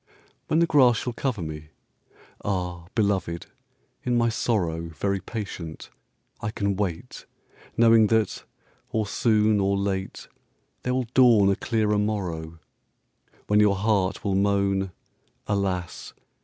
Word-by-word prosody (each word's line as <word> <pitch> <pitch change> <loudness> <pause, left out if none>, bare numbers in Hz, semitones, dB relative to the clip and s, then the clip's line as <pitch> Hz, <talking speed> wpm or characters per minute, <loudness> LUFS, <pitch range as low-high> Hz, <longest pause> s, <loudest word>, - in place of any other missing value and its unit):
When 155 - +1
the 170 - +5
grass 130 -7 +5
shall 125 - -3
cover 120 -6 -2
me! 75 -1 -7 0.8
Ah, 90 -3 -3
belovëd, 95 -6 0 0.6
in 125 -1 +1
my 115 0 +3
sorrowVery 95 -3 -1
patient, 95 -8 -7 0.5
I 105 - -2
can 100 -2 -1
wait, 100 +4 -4 0.5
Knowing 115 -1 +6
that, 110 0 0 0.5
or 110 -1 -1
soon 105 0 +2
or 100 0 +1
late, 95 -1 -3 0.5
There 125 0 -1
will 130 -1 0
dawn 115 -6 +6
a - - +2
clearer 105 -2 0
morrow:When 90 +1 -4
your 105 -1 +4
heart 100 -1 0
will 100 - +1
moan 100 -1 +1 0.5
"Alas! 95 -3 -2
100 Hz, 115 wpm, -25 LUFS, 95-110 Hz, 0.8 s, Knowing